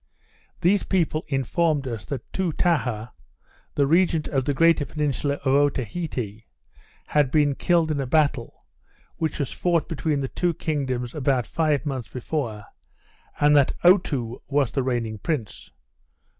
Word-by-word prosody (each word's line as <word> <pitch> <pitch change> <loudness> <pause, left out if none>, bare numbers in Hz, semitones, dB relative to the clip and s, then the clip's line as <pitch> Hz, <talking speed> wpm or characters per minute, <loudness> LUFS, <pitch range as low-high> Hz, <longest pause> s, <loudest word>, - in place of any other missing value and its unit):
These 190 +4 +3
people 165 -4 0
informed 145 +1 0
us, 115 -3 -5
that 140 - -7
Toutaha, 145 - 0 0.7
the 140 - +3
regent 165 +1 +2
of 135 -3 0
the 145 - +1
greater 165 0 +4
peninsula 145 -1 -1
of 135 - +3
Otaheite, 130 - -1 0.6
had 145 -3 +2
been 145 0 +3
killed 165 +2 +2
in 145 -2 -1
a 135 - -3
battle, 140 -3 0 0.5
which 160 -2 -2
was 140 - -2
fought 170 -3 0
between 155 -3 -1
the 135 - -1
two 175 +4 -1
kingdoms 130 -7 -2
about 135 -5 +1
five 155 0 0
months 130 -6 -3
before, 120 -5 -4 0.8
and 150 0 +5
that 140 -2 +4
Otoo 145 - +3
was 140 -3 +1
the 135 - 0
reigning 120 -4 -2
prince. 140 -8 -4
145 Hz, 140 wpm, -24 LUFS, 130-160 Hz, 0.8 s, and